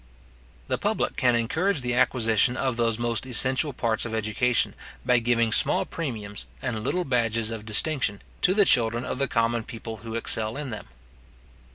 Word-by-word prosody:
The - - -2
public - - -1
can 125 -2 +2
encourage 160 - 0
the 125 -1 -2
acquisition 120 0 +2
of 130 -3 -1
those 115 -2 0
most 120 -1 -1
essential 130 +4 +2
parts 115 -3 -1
of 115 -1 -4
education, 110 +3 0 0.3
by 125 -1 +3
giving 115 -1 +1
small - - +3
premiums, 110 -10 -6
and 115 -4 -4
little 180 +8 -1
badges 115 -3 0
of 110 -1 -7
distinction, 110 -2 +1 0.2
to 185 - +2
the 205 -1 +4
children 120 -3 +4
of 130 - -4
the 140 - +1
common 115 0 0
people 115 -1 -8
who 115 +1 -8
excel 110 0 +1
in 145 -4 -5
them. 105 - -7
120 Hz, 170 wpm, -25 LUFS, 110-130 Hz, 0.3 s, the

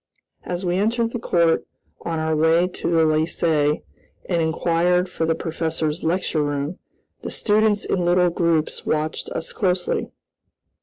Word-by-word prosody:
As 180 +1 -4
we 175 0 +1
entered 230 +3 +1
the 240 - -3
court, 170 -6 +2 0.4
on 165 -1 -3
our 160 0 0
way 160 +3 +3
to 180 - -4
the 165 -1 +3
Lycée 155 -1 +1 0.4
and 170 -2 +1
inquired 170 +2 +1
for 165 -2 -2
the 160 - +2
professor's 160 -1 -2
lecture 165 -1 0
room, 145 +3 -2 0.4
the - - -5
students 210 -1 +2
in 180 - 0
little 175 0 +3
groups 165 -2 0
watched 155 0 -2
us 165 - -4
closely. 180 -3 0
170 Hz, 145 wpm, -22 LUFS, 160-180 Hz, 0.4 s, way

